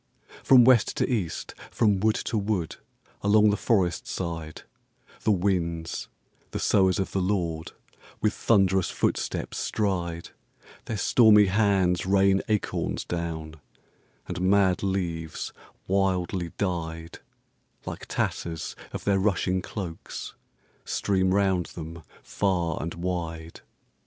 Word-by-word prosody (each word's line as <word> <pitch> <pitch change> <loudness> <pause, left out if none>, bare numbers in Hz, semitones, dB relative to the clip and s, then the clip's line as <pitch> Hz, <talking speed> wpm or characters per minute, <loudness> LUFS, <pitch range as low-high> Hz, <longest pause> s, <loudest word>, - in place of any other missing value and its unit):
From 125 -3 +7
West 125 -3 +4
to - - +1
East, 105 -10 -2 0.2
from 105 -4 +2
wood 110 +2 +2
to 120 - -3
wood, 100 -5 -1 0.4
along 105 +1 +5
the - - +1
forest 95 -7 +1
side, 80 -3 -5 0.6
The 110 - +2
winds, 85 -4 -1 0.4
the - - -4
sowers 95 -2 +3
of 95 - -2
the 95 - 0
LORD, 85 -4 -1 0.5
with 105 - +1
thunderous 95 -4 +2
footsteps - - -2
stride; 85 -5 -2 0.6
Their 110 - -3
stormy 105 0 +6
hands 95 -3 +2
rain 95 0 +4
acorns 105 -2 -1
down; 80 -2 -4 0.7
and 90 -1 -4
mad 95 -1 +3
leaves, 85 -5 -3 0.3
wildly 95 -2 0
dyed, 85 -3 -3 0.7
Like - - -7
tatters 80 -2 -3 0.2
of - - -5
their 100 -1 +2
rushing 95 -2 +1
cloaks, 90 -4 -6 0.5
stream 95 -2 0
round 95 -3 +2
them 80 0 -8 0.2
far 90 -5 -1
and 85 +1 -4
wide. 85 -2 -4
95 Hz, 115 wpm, -26 LUFS, 85-100 Hz, 0.7 s, From